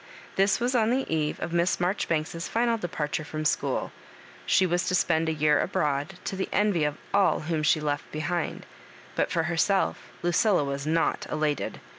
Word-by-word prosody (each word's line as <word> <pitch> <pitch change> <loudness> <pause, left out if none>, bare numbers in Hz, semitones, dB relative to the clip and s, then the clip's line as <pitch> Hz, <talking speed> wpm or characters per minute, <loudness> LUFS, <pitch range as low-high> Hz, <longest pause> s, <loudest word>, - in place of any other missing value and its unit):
This 195 +1 +3
was 245 +2 0
on 225 -3 +3
the 260 +3 +1
eve 150 -1 -1
of 170 - -3
Miss 170 +1 +2
Marjori 180 +3 0
banks's 165 +1 -2
final 235 0 +1
departure 160 -7 -3
from 155 +1 -5
school. - - 0 0.6
She 190 - +4
was 175 0 0
to 185 - +2
spend 165 -2 +2
a - - +1
year 150 -1 +3
abroad, 145 +4 -1
to - - -3
the 190 - -3
envy 205 -7 +2
of 150 0 -2 0.2
all 200 -1 +3
whom 155 0 -1
she 155 +1 +3
left 145 -1 -3
behind; 170 +2 -3 0.5
but - - +1
for 170 -2 0
herself, 175 +4 0
Lucilla 175 0 +3
was 140 +1 -3
not 165 +1 +1
elated. 150 -1 -1
165 Hz, 180 wpm, -27 LUFS, 155-190 Hz, 0.6 s, She